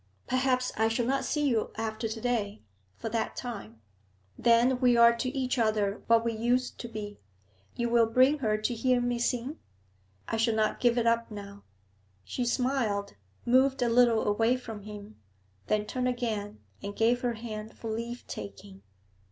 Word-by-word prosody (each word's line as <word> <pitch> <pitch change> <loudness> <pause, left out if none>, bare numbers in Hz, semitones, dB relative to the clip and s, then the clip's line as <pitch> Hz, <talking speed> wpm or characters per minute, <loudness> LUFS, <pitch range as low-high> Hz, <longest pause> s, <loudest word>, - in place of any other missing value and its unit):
Perhaps 255 0 +1
I 220 - +3
shall 225 +1 0
not 270 +2 0
see 295 -1 0
you 230 -5 +1
after 220 0 -2
to 220 +1 -5
day, 220 - -2 0.3
for - - -6
that 225 0 -2
time. 115 - -7 0.5
Then 240 +2 +3
we 245 -2 +4
are 235 0 +7
to 255 +2 -2
each 260 -1 -1
ether 215 -2 +1
what 230 0 +4
we 230 - 0
used 245 +3 0
to 235 - -5
be. 210 -2 -7 0.6
You 235 - -1
will 235 -1 +4
bring 255 +6 +4
her 215 -5 +1
to 215 +3 -1
hear 250 +2 +2
me 245 0 -1
sing? 250 +5 -1 0.7
I - - -1
shall 225 0 +2
not 215 -1 +1
give 240 -1 +3
it 235 - +2
up 230 0 +2
now.' 200 -1 -9 0.6
She 245 - -3
smiled, 240 -5 0 0.3
moved 260 +1 +3
a 240 - +2
little 235 -1 +4
away 225 +4 +2
from 225 -4 -8
him, 210 +1 -10 0.5
then 210 0 +1
turned 250 +3 -2
again 220 -4 -3 0.2
and 200 0 -6
gave 240 +2 +2
her 245 -1 0
hand 220 -1 -7
for 225 - -5
leave 235 +2 -5
taking. 100 -1 -9
230 Hz, 175 wpm, -29 LUFS, 215-245 Hz, 0.7 s, are